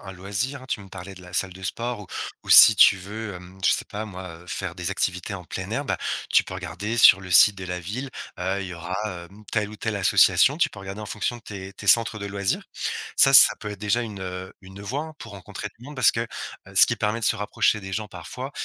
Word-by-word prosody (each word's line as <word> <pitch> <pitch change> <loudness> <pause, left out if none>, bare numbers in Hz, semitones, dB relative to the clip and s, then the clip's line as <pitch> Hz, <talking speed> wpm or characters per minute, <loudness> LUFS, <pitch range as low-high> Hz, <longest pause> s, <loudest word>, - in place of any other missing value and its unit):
un 95 - -9
loisir 100 +9 -4
hein, - - -13
tu - - -3
me 100 - -13
parlais 95 +1 -10
de 95 - -14
la 90 0 -14
salle 95 -1 -1
de 95 +1 -14
sport 115 +5 -4
ou 100 - -11 0.4
ou - - -14
si 110 - +10
tu 100 - +6
veux, 105 +2 -8
hem, 90 +1 -13
je - - +4
sais - - -1
pas 105 +1 -7
moi, 95 -2 -9
heu, 90 - -18
faire 90 -1 -5
des 90 0 -4
activités 95 +1 -2
en 90 - -9
plein - - -7
air - - -3
bah, - - -3 0.3
tu - - +4
peux - - -9
regarder 95 +5 -5
sur 95 -4 +7
le 95 - -11
site 105 +4 +8
de 95 - -8
la 90 0 -4
ville, 110 +11 -6 0.3
heu, 95 +2 -2
il 95 - -7
y 90 - -8
aura, 85 +2 -6
hem, 95 +3 -10
telle 105 -2 -1
ou 105 - -11
telle 110 0 -4
association. 130 +7 +4
Tu 170 - +1
peux 100 - -13
regarder 95 +2 -8
en 105 - -7
fonction 110 +3 -3
de 120 - -16
tes 100 -2 -9
tes 100 - -11
centres 115 +1 +4
de 100 - -6
loisirs. 100 -1 -2 0.5
Ca, 135 - +6
ça 135 - +10
peut 105 - -7
être 105 -2 -9
déjà 105 +4 0
une, 105 -4 -7
heu, 95 0 -7
une 95 +1 -13
voie 130 +9 -4
hein, 160 - -11
pour 115 - -11
rencontrer 100 -2 -8
du 120 - -15
monde 145 +1 -10
parce 130 - +4
que, 115 - -3 0.5
heu, - - -15
ce - - +9
qui - - -2
permet 105 +2 -1
de - - +2
se - - +3
rapprocher 105 +1 0
des 95 -1 -8
gens 110 +1 -4
parfois, 125 - -8
100 Hz, 270 wpm, -23 LUFS, 95-110 Hz, 0.5 s, si